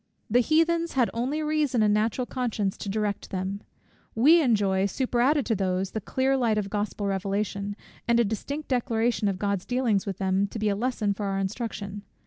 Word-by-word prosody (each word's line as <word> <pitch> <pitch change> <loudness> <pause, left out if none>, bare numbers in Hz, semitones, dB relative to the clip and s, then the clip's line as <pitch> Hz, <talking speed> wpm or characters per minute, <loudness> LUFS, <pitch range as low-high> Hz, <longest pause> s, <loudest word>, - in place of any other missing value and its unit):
The 245 - +5
Heathens 330 +5 +2
had 250 -3 +2
only 265 +7 -1
reason 300 -6 +1
and 210 -1 +4
natural 225 +4 +1
conscience 225 -7 -2
to 200 - -6
direct 210 0 -2
them: 190 +2 -3 0.5
we 305 +9 +6
enjoy, 200 -7 +2
superadded 255 +4 +1
to 225 - +1
these, 190 -1 -1
the 220 - -3
clear 265 +6 +1
light 235 -5 +1
of 200 -2 -2
Gospel 205 0 -2
revelation, 200 +1 -2 0.3
and 235 0 +4
a - - +5
distinct 280 +9 -4
declaration 235 -3 +1
of 195 -2 0
God's 200 -1 -1
dealings 240 -6 +1
with 195 -2 -3
them, 190 +1 +1
to 210 - -7
be 215 -1 +1
a 200 - +1
lesson 220 -2 0
for 200 0 -4
our 195 0 -1
instruction. 200 0 -4
215 Hz, 185 wpm, -26 LUFS, 200-250 Hz, 0.5 s, we